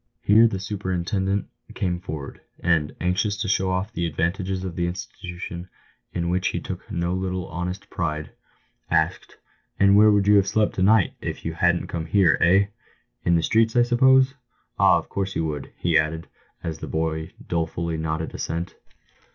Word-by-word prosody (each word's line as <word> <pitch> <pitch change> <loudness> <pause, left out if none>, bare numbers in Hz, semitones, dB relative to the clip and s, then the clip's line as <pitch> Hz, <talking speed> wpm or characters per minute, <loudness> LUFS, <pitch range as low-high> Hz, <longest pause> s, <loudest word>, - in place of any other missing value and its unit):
Here 110 +3 +6
the 100 - -3
superintendent 95 0 -1 0.3
came 90 -2 -1
forward, 75 -6 -7 0.2
and, 80 -4 +1
anxious 95 +3 0
to 105 - -2
show 95 -1 +1
off 95 +4 -2
the 85 -4 -1
advantages 90 +4 -2
of 90 -3 -5
the 85 +1 0
institution, 90 0 -7 0.4
in 85 -1 -2
which 90 +1 +1
he - - -1
took - - -7
no 85 +1 -1
little 95 -1 -2
honest 90 +4 -4
pride, 80 -4 -3 0.6
asked, - - 0 0.2
" - - -42
And 100 0 +6
where 105 +1 +7
would 100 -1 +3
you 105 0 +7
have 100 -1 +3
slept 105 +1 +1
to - - -3
night 100 0 +4
if - - -5
you 80 - -2
hadn't 85 +1 +2
come 80 -1 -4
here 95 +1 +4
— - - -11
eh? 95 +3 +4 0.6
In 85 - +4
the 85 - +2
streets, 115 +3 +2
I 120 - +6
suppose? 130 +2 +4 0.5
Ah, - - +6
of - - -5
course 95 0 -3
you 80 - 0
would," 75 -3 -4
he 85 -2 +3
added, 80 +1 -2 0.4
as 80 -2 -4
the - - -6
boy 80 0 -2
dolefully 85 0 -2
nodded 80 0 -3
assent. 85 +2 -4
90 Hz, 180 wpm, -24 LUFS, 85-100 Hz, 0.6 s, where